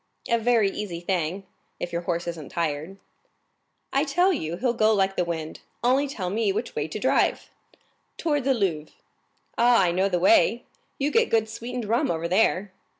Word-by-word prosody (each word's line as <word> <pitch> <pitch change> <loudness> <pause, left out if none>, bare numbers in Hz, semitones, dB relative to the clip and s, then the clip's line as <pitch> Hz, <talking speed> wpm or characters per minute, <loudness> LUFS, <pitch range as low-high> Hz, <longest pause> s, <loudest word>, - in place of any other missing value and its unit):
"A 235 - +2
very 225 -3 +3
easy 190 -5 -5
thing, 180 +1 -2 0.3
if 175 - -5
your 170 - -1
horse 170 -1 -2
isn't 165 -4 -6
tired." 165 +3 -3 1.0
"I 275 +1 +3
tell 355 +6 +2
you 170 - -3
he'll 245 +3 0
go 220 -2 +3
like 195 -1 +1
the 180 - +1
wind,—only 175 - -2
tell 190 -10 -4
me 215 -1 +1
which 210 +5 -3
way 150 +1 -1
to 160 - -6
drive." 255 +5 +1 0.7
"Towards 295 -5 0
the 270 -1 +3
Louvres." 165 -8 -2 0.6
"Ah, 235 -3 +5
I 175 - +2
know 190 +3 +1
the 180 - +1
way—you 270 - +1
get 460 +5 +3
good 220 -1 +2
sweetened 235 +2 -5
rum 230 +3 +1
over 170 0 -1
there." 190 +1 +2
200 Hz, 170 wpm, -25 LUFS, 170-245 Hz, 1.0 s, Ah